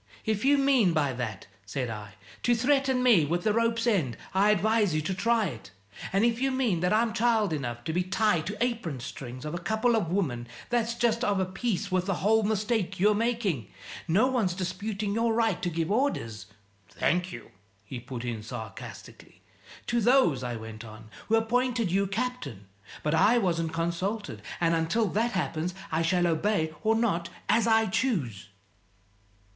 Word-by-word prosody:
"If 215 -1 0
you 285 +2 +5
mean 265 -10 +3
by 145 -4 +1
that," 120 -5 -5 0.2
said 120 +4 -3
I, 105 -2 -8 0.3
"to 240 - +3
threaten 265 +1 +2
me 230 -10 +6
with 170 +4 -1
the 215 - +2
rope's 230 0 +1
end, 170 - +1 0.2
I 195 +2 +4
advise 210 -3 +2
you 155 - +1
to 190 - -1
try 230 +3 +2
it. 115 - -7 0.4
And 195 +4 +3
if 235 +1 +1
you 270 - +2
mean 255 -9 +1
that 180 +2 +1
I'm 220 +1 +2
child 225 -5 +2
enough 120 -5 -4
to 160 - -3
be 180 - +1
tied 185 -3 +1
to 205 +2 -4
apron 225 - -2
strings 125 +2 -8
of 150 - -4
a 175 - -3
couple 220 +6 +1
of 205 -7 0
women, 135 -11 -1 0.2
that's 235 -1 +1
just 235 0 +1
of 205 -5 +1
a 190 - +1
piece 200 0 -2
with 185 0 0
the 195 - +1
whole 220 +4 +3
mistake 210 -2 -1
you're 210 +3 +5
making. 210 - -1 0.4
No 190 +9 +4
one's 235 -9 0
disputing 200 +3 -3
your 230 +1 +1
right 225 -6 +1
to 180 - 0
give 165 +1 -2
orders 115 - -1 0.2
" 100 -1 -35
"Thank 180 +1 +1
you," 115 -2 -10 0.3
he 125 +4 -6
put 120 0 -7
in 115 -3 -3
sarcastically. 110 -1 -10 0.2
" - - -18
To 235 0 0
those," 235 - +4
I 120 -1 -3
went 110 0 -8
on, 110 -1 -12 0.2
"who 225 - +3
appointed 235 -2 +1
you 195 +2 +2
captain. 230 - -4 0.4
But 150 - 0
I 220 +9 +5
wasn't 170 -6 0
consulted, 175 +6 -2 0.2
and 170 -1 +2
until 165 +8 +1
that 230 +6 0
happens, 170 0 -2 0.2
I 160 +1 +1
shall 175 +2 +2
obey 160 -1 +1
or 220 0 +2
not, 175 -7 0 0.2
as 225 +2 +3
I 225 0 +4
choose." 175 - -1
195 Hz, 185 wpm, -28 LUFS, 160-230 Hz, 0.4 s, me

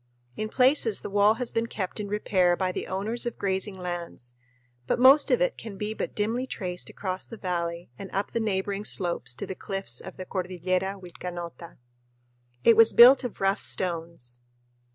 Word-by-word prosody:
In 215 - -4
places 250 -4 +3
the - - -7
wall 205 +2 +4
has 250 0 -1
been 230 0 -1
kept 195 -2 -5
in 210 - -4
repair 190 -3 +2
by 185 -1 0
the - - -5
owners 215 +6 0
of 240 - -5
grazing 190 0 -2
lands, 175 -9 -6 0.5
but - - +1
most 270 +4 +6
of - - +2
it - - 0
can 210 -4 -8
be 210 +1 -3
but - - -5
dimly 230 +5 -1
traced 180 -7 -4
across 185 -2 -4
the 230 - -9
valley 170 - -4
and 195 - -7
up 195 +1 -2
the 230 - -1
neighboring 200 -1 -2
slopes 170 -11 -1
to 170 - -5
the 190 - -5
cliffs 195 - -3
of - - -10
the 185 - -6
Cordillera 185 +1 -2
Vilcanota. 175 -1 -8 0.9
It 230 - +6
was 225 0 +7
built 255 +4 +8
of 245 -5 -6
rough 195 +1 +1
stones. 165 -9 -2
195 Hz, 180 wpm, -26 LUFS, 180-220 Hz, 0.9 s, built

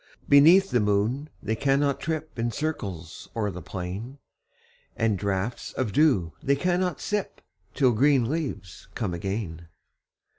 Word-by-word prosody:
Beneath 170 +8 +7
the 125 - +3
moon 105 +8 0
they 110 - -1
cannot 140 +2 +1
trip 155 -5 -4
In 115 +1 0
circles 100 - -5
o'er 105 -3 -1
the 90 0 -7
plain; 95 +11 -6 0.8
And 110 -2 +1
draughts 100 +4 -3
of 115 -6 -2
dew 110 - +3
they 140 - +2
cannot 180 +4 0
sip, 210 -1 -3 0.4
Till 130 -4 +4
green 130 +1 +3
leaves 135 - -4
come 100 -6 -2
again. 85 -2 -4
120 Hz, 135 wpm, -26 LUFS, 100-145 Hz, 0.8 s, Beneath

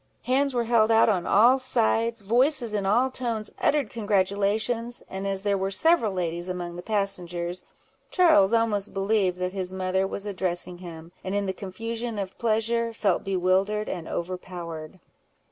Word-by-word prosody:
Hands 275 +3 +2
were 240 -2 0
held 225 -1 +3
out 225 0 +5
on 185 -5 0
all 240 +6 +5
sides—voices 235 +1 +1
in 200 -2 -1
all 245 +6 +3
tones 230 -4 -3
uttered 285 -7 +1
congratulations; 215 +3 0
and 195 +1 -5
as 195 0 -1
there 200 -1 +1
were 190 +1 -1
several 235 - +3
ladies 175 -1 -3
among 175 -1 -4
the 175 - -6
passengers, 180 -4 -2 0.5
Charles 315 - +5
almost 220 -4 0
believed 195 -2 +1
that 180 0 -3
his 185 -2 -3
mother 190 0 0
was 200 +1 -5
addressing 180 -3 -2
him, 165 -2 -10
and 190 +1 -3
in 205 0 0
the 190 - -2
confusion 225 +4 -5
of 195 -2 -4
pleasure, 230 +1 +1
felt 200 -5 +1
bewildered 195 +3 +1
and 165 -2 -5
overpowered. 175 -2 -6
200 Hz, 155 wpm, -26 LUFS, 185-230 Hz, 0.5 s, out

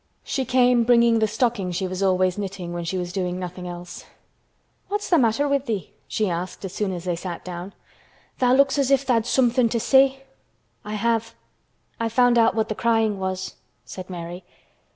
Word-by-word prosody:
She 265 -2 -2
came 250 -1 +4
bringing 235 -1 +4
the 220 - +2
stocking 220 -4 -1
she 185 +2 -2
was 185 +1 -5
always 185 -1 +2
knitting 190 -4 -5
when 175 0 -4
she 170 +3 -3
was 175 -1 -4
doing 180 -2 -2
nothing 180 0 -6
else. 175 0 -8 0.8
"What's 415 +1 -2
the 340 - +6
matter 240 +4 +2
with 280 -1 0
thee?" 210 -5 -3
she 215 - -1
asked 180 +2 -4
as 190 - -6
soon 205 -2 -1
as 175 -2 -5
they 180 -2 -1
sat 175 0 -6
down. 180 +2 -7 0.7
"Tha' 250 -1 +3
looks 275 +1 +3
as 275 -2 +2
if 275 -1 +3
tha'd 235 -3 +1
somethin' 245 -2 +3
to 230 - 0
say." 270 +2 +4 0.6
"I 210 0 -5
have. 230 +1 -1 0.6
I 230 - 0
have 225 - -3
found 245 -1 +4
out 225 -1 +4
what 220 -1 +1
the 215 - -2
crying 225 -2 +1
was," 190 0 -4 0.3
said 185 0 -9
Mary. 175 0 -7
215 Hz, 195 wpm, -23 LUFS, 185-245 Hz, 0.8 s, the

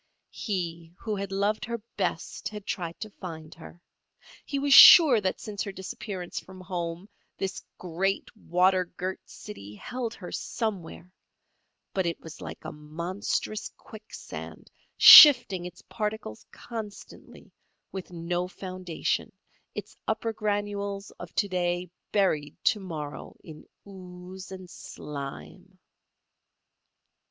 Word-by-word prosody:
He 170 -6 -4
who 215 -2 -3
had 200 -1 -5
loved 200 +2 0
her 235 +1 -3 0.2
best - - -3
had 210 -2 -9
tried 170 -2 -4
to 215 -1 -6
find 160 -5 -9
her. 170 +1 -13 0.7
He 280 - -2
was 280 0 +2
sure 275 -6 +10
that 190 -1 -1
since 205 -2 -6
her 200 - -3
disappearance 190 -1 -6
from 185 0 -13
home 175 0 -5 0.3
this 190 0 -4
great, 185 +5 -2
water 185 -1 +2
girt 185 +2 -5
city 105 - -10
held 240 - -5
her 180 - -9
somewhere, 185 -6 -4 0.8
but 190 -3 0
it 170 - -3
was 160 -1 -11
like - - -9
a - - -5
monstrous 170 +8 -4
quicksand, 220 0 -10 0.3
shifting 200 - +10
its 180 - -13
particles 210 - -5
constantly, 220 -3 -10 0.4
with 190 -2 -7
no 175 +1 -3
foundation, 185 -2 -3 0.4
its - - -7
upper 225 -1 -1
granules 205 -2 -3
of 175 -1 -9
to 205 - +1
day 175 -1 -2 0.2
buried 155 -8 +1
to 220 -4 +3
morrow 155 -6 -7
in 155 -2 -12 0.2
ooze 185 0 -10
and 185 -1 -9
slime. 160 +5 -9
185 Hz, 120 wpm, -27 LUFS, 175-205 Hz, 0.8 s, sure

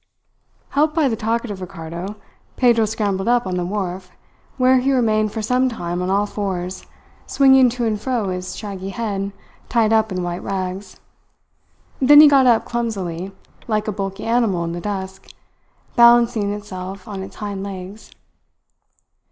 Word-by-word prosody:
Helped 300 +2 +1
by 315 -4 +3
the 230 - 0
talkative 225 -2 -2
Ricardo, 170 +3 -7 0.4
Pedro 235 -3 +4
scrambled 205 -2 -2
up 240 -1 +2
on 185 -1 -2
the 180 - -1
wharf, 185 -2 -4 0.5
where 255 0 +4
he 265 +2 +1
remained 215 -4 +2
for 220 0 -4
some 250 +3 +2
time 175 -6 -4
on 180 - -2
all 200 +2 +2
fours, 185 -3 -4 0.4
swinging 265 -2 +5
to 240 0 -3
and 215 -2 -1
fro 240 -6 -1
his 185 0 -5
shaggy 195 -3 -6
head 200 -1 -3 0.4
tied 225 -2 +2
up 220 -1 +2
in 185 -1 -2
white 175 0 -4
rags. 190 0 -5 1.0
Then 290 +2 +7
he 305 - +10
got 275 -3 +5
up 235 -2 +4
clumsily, 195 -7 -3 0.4
like 215 -2 -1
a - - 0
bulky 195 0 -5
animal 225 -7 +1
in 170 - -3
the 175 +1 -5
dusk, 190 -1 -6 0.6
balancing 235 -3 +5
itself 190 -2 -7
on 200 -3 -6
its 190 - -9
hind 205 -2 -5
legs. 195 +1 -8
205 Hz, 155 wpm, -20 LUFS, 190-235 Hz, 1.0 s, he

